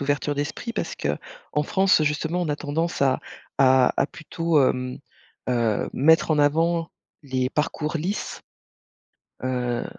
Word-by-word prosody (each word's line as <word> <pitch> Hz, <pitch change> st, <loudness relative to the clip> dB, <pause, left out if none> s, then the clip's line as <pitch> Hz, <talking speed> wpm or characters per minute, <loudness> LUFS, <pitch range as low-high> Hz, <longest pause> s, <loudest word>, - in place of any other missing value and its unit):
ouverture 145 Hz, +1 st, -1 dB
d'esprit, 150 Hz, +11 st, -3 dB
parce -, -, -3 dB
qu'en 320 Hz, -, -4 dB
France, 190 Hz, -1 st, +3 dB
justement, 160 Hz, +4 st, -1 dB
on 160 Hz, -, -2 dB
a 145 Hz, -, +1 dB
tendance 160 Hz, +2 st, -2 dB
à 135 Hz, -1 st, +3 dB, 0.4 s
à 130 Hz, -1 st, +5 dB
à -, -, +3 dB
plutôt, 160 Hz, -1 st, 0 dB
hem 125 Hz, 0 st, -1 dB, 0.5 s
heu, 115 Hz, -4 st, +1 dB
mettre 160 Hz, +4 st, +4 dB
en 150 Hz, -, +3 dB
avant 165 Hz, +3 st, +2 dB, 0.3 s
les 130 Hz, -1 st, -1 dB
parcours 155 Hz, +1 st, -1 dB
lisses, 185 Hz, +7 st, -4 dB, 1.0 s
heu 125 Hz, -2 st, -1 dB
150 Hz, 130 wpm, -24 LUFS, 130-165 Hz, 1.0 s, à